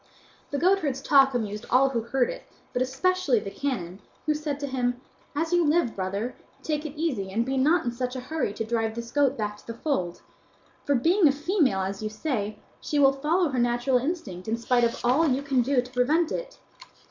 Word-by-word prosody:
The 285 - -2
goatherd's 320 -5 +2
talk 270 -1 +4
amused 210 -3 -3
all 270 +2 +5
who 240 -3 -1
heard 245 +2 0
it, - - -9 0.3
but 245 - 0
especially 270 +1 +1
the 200 -1 -7
canon, 195 -11 -3 0.3
who 305 - +2
said 300 -2 -3
to - - -1
him, 245 -2 -1 0.4
"As 325 +3 -1
you 350 -1 +4
live, 300 -6 +2
brother, 200 +6 -3 0.3
take 305 0 -2
it 300 +1 -10
easy, 255 -13 -1
and 230 +4 0
be 265 +1 -1
not 305 +5 +3
in 240 - 0
such 250 +1 -3
a - - -3
hurry 280 -1 -2
to 225 - -3
drive 225 -1 -1
this 235 0 -6
goat 280 -1 +2
back 210 -1 -3
to - - -20
the 230 - -5
fold; 210 - -2 0.6
for, 285 - +2
being 335 - +4
a - - +5
female, 295 - +1
as 195 +1 -3
you 215 - -2
say, 215 -3 -3 0.2
she 295 - -2
will 275 -1 +6
follow 310 +5 +1
her 260 -2 -1
natural 240 +2 +2
instinct 240 - -4
in 225 +1 0
spite 240 +1 +2
of 235 0 +1
all 280 +7 +4
you 270 0 +1
can 270 -3 +2
do 250 0 +2
to 250 - -13
prevent 300 +7 +2
it. - - -5
260 Hz, 215 wpm, -26 LUFS, 230-300 Hz, 0.6 s, will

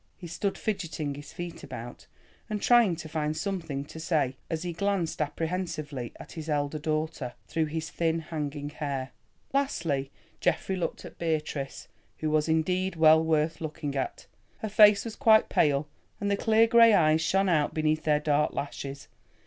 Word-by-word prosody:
He 180 - -10
stood 195 +4 -2
fidgeting 165 -8 -3
his 145 0 -10
feet 175 0 -7
about, - - -8 0.4
and 210 -1 -2
trying 235 -6 +5
to 160 -1 -8
find 155 0 -2
something 165 -7 -3
to 160 - -10
say, 155 -5 0
as 165 0 -2
he 175 -1 -3
glanced 185 -3 -1
apprehensively 155 -4 -3
at - - -11
his 160 -1 -7
elder 145 0 -1
daughter, 155 -4 -2
through 160 -1 0
his 160 +1 -4
thin 165 -1 0
hanging 150 -3 -4
hair. 140 -3 -4 0.4
Lastly, 165 - 0 0.3
Geoffrey 190 - 0
looked 175 -3 -3
at - - -12
Beatrice, 155 -4 -3 0.3
who 155 -1 -2
was 155 +1 +2
indeed 180 +3 +1
well 160 0 +6
worth 160 0 +1
looking 150 -2 -4
at. 135 - -3 0.3
Her 220 - -4
face 210 -1 +6
was 225 - -5
quite 220 -5 +5
pale 145 0 +2 0.3
and 200 0 -1
the - - +3
clear 225 +2 +4
grey 230 -1 +7
eyes 155 -2 +4
shone 195 +4 +2
out 155 -5 +2
beneath 155 0 +1
their 150 -1 +3
dark 150 0 +1
lashes. 140 0 -5
160 Hz, 165 wpm, -28 LUFS, 150-180 Hz, 0.4 s, grey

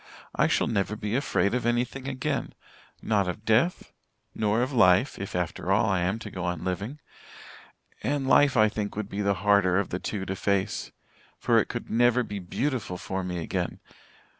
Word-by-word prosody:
I - - +3
shall - - +2
never 105 -2 -1
be 105 +1 -3
afraid 125 -6 +1
of 125 - 0
anything 120 +3 -1
again 130 -1 -3 0.5
not 100 -4 +1
of 105 +4 -6
death 120 +11 +1 0.4
nor 110 +2 +1
of 130 +2 -3
life, 105 +1 +4
if 100 - -5
after 90 +1 -2
all, 100 +3 +4
I 95 -4 +1
am 90 +5 0
to 105 -2 -8
go 90 - -5
on 90 -2 -2
living. 100 +10 -3 1.0
And 140 -1 -1
life, 135 -1 +5
I 110 0 +6
think, 105 -1 -4
would 105 -1 -4
be 100 - -3
the 100 -1 +1
harder 100 -3 +4
of 100 - 0
the 90 - -3
two 95 -1 -4
to 95 - -3
face 100 0 -1 0.5
for - - +3
it - - 0
could - - -6
never 120 +1 +3
be 105 -3 -5
beautiful 110 +1 -2
for 95 +1 -4
me 90 -1 -3
again. 85 - -3
105 Hz, 190 wpm, -27 LUFS, 95-120 Hz, 1.0 s, I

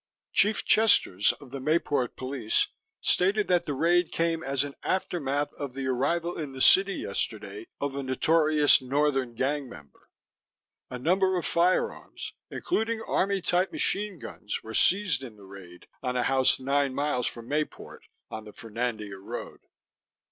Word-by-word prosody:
Chief 210 +1 +3
Chesters 190 - +4
of 135 -3 -15
the 140 - -5
Mayport 145 -3 0
Police 130 -4 0 0.3
stated 200 +3 +2
that 180 -1 +3
the 145 - -3
raid 175 +4 +2
came 165 -1 0
as 135 -2 0
an 145 -1 -6
aftermath 145 -6 -1
of 140 -3 -7
the 135 -1 -4
arrival 165 +8 -1
in 145 -4 -5
the 135 - -8
city 195 +7 +5
yesterday 380 -4 -4
of 140 -1 -3
a 140 - -2
notorious 150 +2 +3
northern 135 -2 0
gang 135 +2 -1
member. 70 - -15 0.8
A 125 - -5
number 185 +7 +2
of 175 - -3
firearms, 175 +2 0 0.2
including 230 -9 -1
army 195 -2 0
type 180 +2 +1
machine 205 -1 -1
guns, 105 -7 -6
were 110 - -8
seized 190 - +2
in 120 -5 -9
the 100 -2 -15
raid 95 -2 -13 0.2
on 125 -1 -2
a 125 - +1
house 130 0 +3
9 140 0 0
miles 140 -4 0
from 115 -1 -7
Mayport 150 +2 -4 0.3
on 110 0 -6
the 105 - -11
Fernandina 110 -3 -4
road. 95 - -7
140 Hz, 155 wpm, -27 LUFS, 125-175 Hz, 0.8 s, city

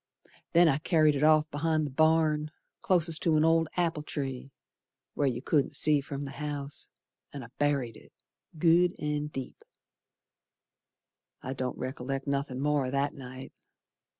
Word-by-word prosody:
Then 170 +1 +6
I 145 -2 +2
carried 155 -2 +3
it 140 - -2
off 155 0 +5
be'ind 155 +1 0
the 145 - -5
barn, 155 0 +2 0.3
Clost 175 -7 +1
to 165 -2 +2
an 155 +1 +4
old 165 0 +3
apple 170 -3 0
tree 135 -2 -5 0.6
Where 145 - 0
you 125 0 -2
couldn't 145 -3 +1
see 150 -2 +3
from 140 0 -6
the 140 - -6
house, 145 -1 -5 0.4
An' 140 -3 -7
I 115 - -11
buried 140 -6 0
it, - - -18 0.5
Good 175 +2 +3
an' 150 0 -2
deep. 135 -3 -8 1.8
I 130 - -4
don't 130 -1 -4
rec'lect 135 +1 -4
nothin' 140 -2 -2
more 145 -1 +1
o' - - -3
that 140 +2 0
night. 130 -1 -10
145 Hz, 150 wpm, -29 LUFS, 135-155 Hz, 1.8 s, Then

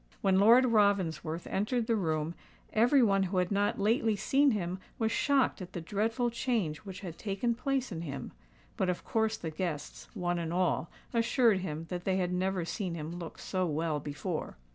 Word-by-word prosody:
When 190 -1 +3
Lord 235 +6 +7
Ravensworth 185 - +1
entered 225 +4 0
the 230 - +2
room, 160 -4 -1 0.4
every 245 +4 +5
one 195 -3 +3
who 190 0 -1
had 180 +1 +1
not 205 +1 +1
lately 220 +1 +2
seen 275 +7 +3
him 185 -5 -1 0.2
was 225 -1 0
shocked 275 -7 +2
at 185 0 -8
the - - -3
dreadful 225 +7 0
change 225 -10 -1
which 195 -1 -9
had 175 -4 -7
taken 215 +3 -1
place 260 +1 -1
in 165 -3 -4
him; 140 -5 -5 0.5
but 185 - +1
of 180 - -2
course 220 0 +1
the 160 - -5
guests, 155 -3 -4
one 175 0 -1
and 165 -1 -3
all, 175 -2 +1 0.2
assured 230 -2 +3
him 160 -3 -4
that 180 -1 -4
they 190 0 +1
had 180 -1 0
never 185 -1 0
seen 180 -1 -3
him 155 0 -5
look 165 -2 -7
so 185 -1 -1
well 155 0 -1
before. 145 - -4
190 Hz, 185 wpm, -31 LUFS, 170-225 Hz, 0.5 s, Lord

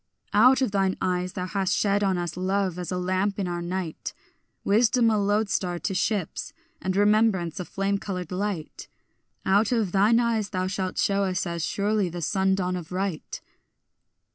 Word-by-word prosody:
Out 250 +6 +6
of 250 - 0
thine 195 -1 +1
eyes 180 0 -1
thou 180 -2 -3
hast 195 -1 0
shed 205 0 +2
on 190 -2 +2
us 175 -2 -3
love 185 0 -1
as 180 - -4
a 180 - -1
lamp 185 +2 0
in 195 -3 -1
our 175 0 -3
night, 175 -2 -4 0.5
Wisdom 230 +2 +3
a 215 - +2
lodestar 200 -3 0
to 195 - -3
ships, 190 -1 -2 0.3
and 185 0 -1
remembrance 205 -4 +2
a 180 - -4
flame 195 +2 -1
coloured 180 -4 -5
light; 185 -4 -4 0.6
Out 200 +4 +3
of 225 -7 +1
thine 210 +5 +4
eyes 225 -4 0
thou 185 -2 -1
shalt 185 0 -3
shew 200 0 +2
us 190 -1 0
as 170 -2 -3
surely 205 0 0
the 175 +1 -6
sun 190 +3 +1
dawn 180 -1 -1
of 175 -2 -7
right. 185 -3 -3
190 Hz, 175 wpm, -26 LUFS, 180-205 Hz, 0.6 s, Out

